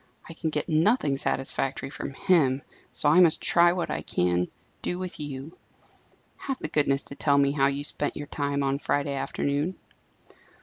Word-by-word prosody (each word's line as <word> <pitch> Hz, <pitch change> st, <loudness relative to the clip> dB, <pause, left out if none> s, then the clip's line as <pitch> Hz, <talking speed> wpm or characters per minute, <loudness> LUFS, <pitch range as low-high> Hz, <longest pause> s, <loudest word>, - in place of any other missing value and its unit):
I 165 Hz, -, -8 dB
can 160 Hz, 0 st, -3 dB
get 150 Hz, -1 st, -2 dB
nothing 160 Hz, -, +2 dB
satisfactory 135 Hz, 0 st, -1 dB
from 135 Hz, -, -6 dB
him; 145 Hz, -9 st, +2 dB, 0.3 s
so -, -, +4 dB
I 155 Hz, +5 st, +6 dB
must 170 Hz, -4 st, +5 dB
try 170 Hz, 0 st, +4 dB
what 175 Hz, -1 st, -2 dB
I -, -, -2 dB
can 90 Hz, 0 st, 0 dB, 0.3 s
do 175 Hz, -, -2 dB
with 185 Hz, -1 st, -6 dB
you. 145 Hz, +1 st, -6 dB, 0.8 s
Have 270 Hz, -2 st, -4 dB
the -, -, -5 dB
goodness 140 Hz, -2 st, +1 dB
to 140 Hz, -, -9 dB
tell 140 Hz, -1 st, +2 dB
me 140 Hz, 0 st, +4 dB
how 135 Hz, -1 st, +2 dB
you 140 Hz, +1 st, -2 dB
spent 145 Hz, 0 st, -2 dB
your 145 Hz, -, -5 dB
time 140 Hz, -1 st, -2 dB
on 135 Hz, 0 st, 0 dB
Friday 145 Hz, -1 st, -1 dB
afternoon." 145 Hz, +5 st, -2 dB
145 Hz, 175 wpm, -26 LUFS, 140-165 Hz, 0.8 s, I